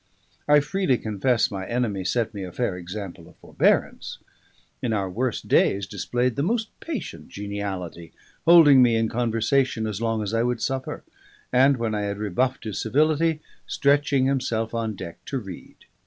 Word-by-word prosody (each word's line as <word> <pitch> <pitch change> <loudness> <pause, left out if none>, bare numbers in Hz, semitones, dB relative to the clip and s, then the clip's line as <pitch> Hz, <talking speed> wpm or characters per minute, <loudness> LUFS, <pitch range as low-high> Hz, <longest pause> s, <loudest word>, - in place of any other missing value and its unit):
I 145 0 +6
freely 170 -4 0
confess 115 +3 0
my 95 -1 -5
enemy 115 -6 -1
set 115 +4 -1
me 100 -2 -5
a 90 - -7
fair 110 -2 -2
example 90 +1 -8
of - - -20
forbearance; - - 0 0.6
in 115 - -1
our 100 -3 0
worst 115 +6 -3
days 100 0 +3
displayed 120 +5 -1
the - - -1
most 220 +7 -1
patient 220 - -6
geniality, 100 -4 -5 0.3
holding 160 -6 +8
me 120 -2 +4
in 115 0 +1
conversation 115 +1 0
as 110 -1 -4
long 115 -1 0
as 105 +1 -4
I 115 - +2
would 120 0 0
suffer, 130 +1 -3 0.5
and 135 +2 +5
when 115 -2 -2
I 105 - -1
had 100 0 -3
rebuffed 125 +7 -1
his 110 -4 -4
civility, 155 +5 +2 0.3
stretching 140 -1 +2
himself 120 -5 -1
on 115 -2 -2
deck 90 -3 -9
to 135 - -3
read. 95 -8 -9
115 Hz, 165 wpm, -24 LUFS, 100-135 Hz, 0.6 s, holding